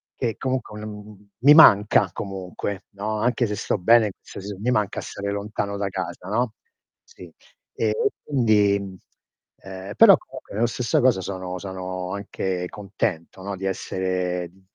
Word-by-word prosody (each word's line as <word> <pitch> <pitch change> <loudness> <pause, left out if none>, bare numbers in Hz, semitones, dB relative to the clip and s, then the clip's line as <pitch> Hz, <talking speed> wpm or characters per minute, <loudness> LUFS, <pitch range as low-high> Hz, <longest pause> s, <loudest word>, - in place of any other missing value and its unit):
Che 115 -4 -2
comunque, 130 -5 -3
mhmm, 105 -1 -11
mi 140 +5 +8
manca 105 - +7
comunque, 95 0 -5
no. 105 +2 -3
Anche 120 +2 +1
se 105 - -3
sto - - -1
bene 110 +2 +5
se - - -10
s 100 +2 -6
mi 100 +6 -3
manca 105 -4 0
stare 100 0 -5
lontano 100 0 -3
da 100 -1 -2
casa, 90 - -5
no. 115 +2 0 0.5
Sì. 465 - -14 0.4
E - - 0 0.3
quindi, 110 -7 +3 0.8
ehm, 95 +1 -8
però - - +9
comunque - - -12
nella 115 +4 +2
stessa 120 +1 0
cosa 125 -6 +4
sono 95 -1 -5
sono 95 -1 -5
anche 95 -2 -3
contento, 100 -3 -4
no, 100 +1 -4
di 95 - -5
essere 90 -2 -2
d 95 +3 -25
100 Hz, 150 wpm, -24 LUFS, 95-110 Hz, 0.8 s, però